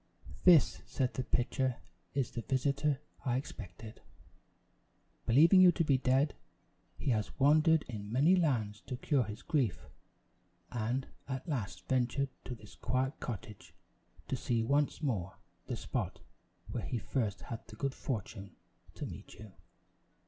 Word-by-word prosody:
"This," 170 -5 +6
said 130 -2 -1
the 130 - -2
pitcher, 130 0 0 0.4
"is 135 -3 0
the 120 - -4
visitor 140 +2 +1 0.2
I 125 -2 +1
expected. 110 -3 -8 1.3
Believing 165 +10 +7
you 180 -1 +9
to 165 - +1
be 140 -4 +3
dead, 135 +3 +3 0.6
he 135 - 0
has 105 -4 -1
wandered 155 +3 +5
in 105 -3 -7
many 145 +10 +5
lands 115 - +1
to 130 -2 -3
cure 135 -2 +2
his 105 +2 -7
grief; 120 - 0 0.9
and 125 +3 -1 0.2
at 130 +2 -4
last 95 - -3
ventured 130 +2 +1 0.2
to 125 - -4
this 105 -2 -14
quiet 130 +4 -1
cottage 110 -3 -7 0.5
to - - -1
see 115 -2 0
once 145 +5 +1
more 95 - -1 0.3
the - - -2
spot - - -3 0.5
where - - -2
he 125 - -2
first 110 -3 -2
had 115 -1 -7
the 115 - -11
good 135 +4 -1
fortune 100 -7 -5 0.4
to - - -4
meet - - -9
you. 110 -2 -11
130 Hz, 140 wpm, -33 LUFS, 110-140 Hz, 1.3 s, you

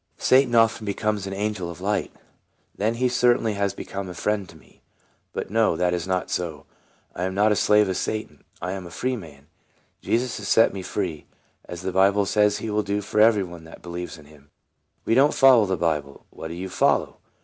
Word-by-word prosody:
" - - -45
Satan 130 -2 +3
often 115 -1 +3
becomes 105 -1 -2
an 95 - -5
angel 100 -3 -3
of 85 - -9
light." 100 +1 -1 0.4
" - - -44
Then 110 +3 +1
he 125 +2 +1
certainly 120 -2 +2
has 100 -1 -1
become 100 -1 -6
a 90 - -8
friend 105 -2 -1
to 80 - -14
me. - - -23 0.5
But - - -5
no, 110 -5 +2
that 90 +1 +1
is 85 0 -3
not 95 -1 -1
so; 80 -5 -3 0.5
I 90 - -3
am 95 0 -3
not 105 +2 +3
a - - +3
slave 105 0 +4
of 95 - -2
Satan, 110 +3 -4 0.2
I 90 - -2
am 95 -2 -6
a - - -10
free 130 +9 -2
man. 75 - -11 0.6
Jesus 120 +1 -1
has 105 - -6
set 115 - +4
me 95 - -5
free, 90 -4 -4 0.4
as 85 0 -8
the 95 - -2
Bible 100 +2 +3
says 105 +1 +2
he 110 - -4
will 105 0 +1
do 100 0 -2
for 105 +1 0
every 110 -2 +5
one 85 -2 -10
that 80 - -14
believes 90 0 -6
in 75 - -15
him." 75 -1 -19 0.6
"We - - +1
do 135 +4 +6
n't - - -5
follow 125 -6 +6
the 95 -1 -1
Bible." 75 -4 -2
" - - -44
What 80 - -8
do 85 - -7
you 90 +2 -5
follow - - +1
100 Hz, 225 wpm, -24 LUFS, 90-110 Hz, 0.6 s, do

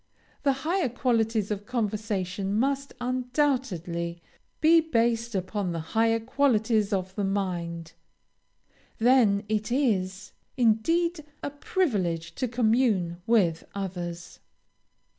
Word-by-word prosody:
The 280 -2 +3
higher 345 -4 +1
qualities 225 -4 0
of 205 0 -4
conversation 205 -4 -2
must 275 +3 0
undoubtedly 245 - -1 0.4
be 330 +1 +6
based 235 -6 0
upon 190 -1 -2
the 165 - -3
higher 225 0 +3
qualities 225 -4 +1
of 190 -1 -1
the 205 - -2
mind; 175 -4 -2 1.0
then 225 -4 +4
it 215 +2 -1
is, 195 -8 0 0.3
indeed, 310 +9 +2 0.2
a 285 - -3
privilege 200 - -1
to 255 - -2
commune 220 -7 +1
with 185 -8 +3
others. 175 -3 -5
220 Hz, 105 wpm, -27 LUFS, 190-255 Hz, 1.0 s, be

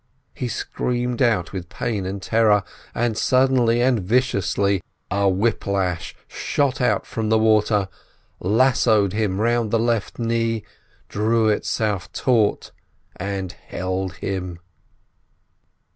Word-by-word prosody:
He 125 - -4
screamed 125 +1 -2
out 110 -9 +2
with 90 -2 -6
pain 105 -5 -3
and 95 0 -5
terror, 110 -3 +3 0.3
and 120 -2 0
suddenly 125 -1 +3
and 125 -2 +3
viciously 100 -3 +1 0.3
a 100 0 +2
whip 100 +4 0
lash 90 -4 -1
shot 140 -1 -1
out 125 - +1
from 110 -1 -3
the 110 - +4
water, 105 -2 +3 0.5
lassoed 110 -2 +3
him 105 -3 -1
round 115 0 +1
the 115 - +2
left 115 -2 -1
knee, 115 -2 0 0.4
drew 110 +1 +1
itself 105 -2 -1
taut, 115 -5 +1 0.5
and 95 -1 -3
held 95 0 -4
him. 90 -1 -4
110 Hz, 115 wpm, -22 LUFS, 100-120 Hz, 0.5 s, the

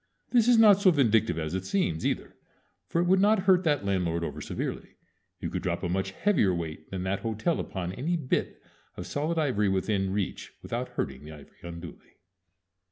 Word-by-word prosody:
This 235 -2 +4
is 245 -1 +6
not 210 -3 +7
so 195 - +6
vindictive 115 - +3
as 80 0 -3
it 95 0 -2
seems, 95 - -1
either; - - -3 0.5
for 170 - -1
it - - +1
would 185 +2 +4
not 210 -1 +4
hurt 185 -1 +4
that 145 -9 +1
landlord 90 -4 0
over - - -5
severely. - - -5 0.4
You - - -4
could - - -3
drop 85 0 -2
a 90 - -1
much 95 +2 -1
heavier 100 - +2
weight 80 -2 -6
than 95 -1 -4
that 95 +1 -1
hotel 115 +9 -1
upon 90 -2 -4
any 165 - -1
bit 140 -5 -2 0.3
of 90 - -5
solid 155 - -2
ivory 125 -10 +1
within 95 0 0
reach 100 -1 -3
without - - -3
hurting 65 +1 -4
the 75 +1 -9
ivory 75 -2 -15
unduly. 85 -1 -10
100 Hz, 190 wpm, -28 LUFS, -, 0.5 s, not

